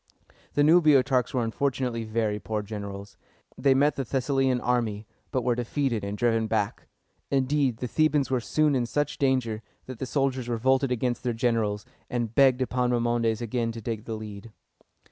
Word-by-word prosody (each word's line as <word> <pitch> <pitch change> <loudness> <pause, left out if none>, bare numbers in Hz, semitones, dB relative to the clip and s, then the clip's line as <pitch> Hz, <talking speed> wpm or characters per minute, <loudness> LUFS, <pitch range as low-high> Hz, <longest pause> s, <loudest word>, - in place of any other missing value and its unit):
The 145 - +4
new 165 +4 +6
Boeotarchs 130 -5 +3
were 125 -2 0
unfortunately 125 -1 -1
very 110 -1 -1
poor 105 0 -3
generals. 100 -1 -7 0.4
They 135 -2 +3
met 145 +2 +3
the 135 - -1
Thessalian 135 0 +1
army, 115 -4 -1 0.2
but 130 -3 -1
were 125 - +2
defeated 120 -1 -1
and 100 +1 -4
driven 115 -1 +1
back. 105 -2 -2 0.4
Indeed, 135 -2 +1
the 125 - -4
Thebans 150 0 +1
were 130 - +2
soon 155 +4 +2
in 125 -3 0
such 145 +4 -2
danger, 130 -5 +1 0.2
that 130 -3 -8
the 130 - -3
soldiers 130 -3 -1
revolted 130 +3 +1
against 125 0 -1
their 120 -2 -1
generals, 115 -3 0 0.2
and 120 -3 -2
begged 130 -1 +4
Epaminondas 120 -2 0
again 115 0 -1
to 115 - -7
take 110 -1 -4
the 115 - -4
lead. 105 0 -9
120 Hz, 165 wpm, -26 LUFS, 115-135 Hz, 0.4 s, new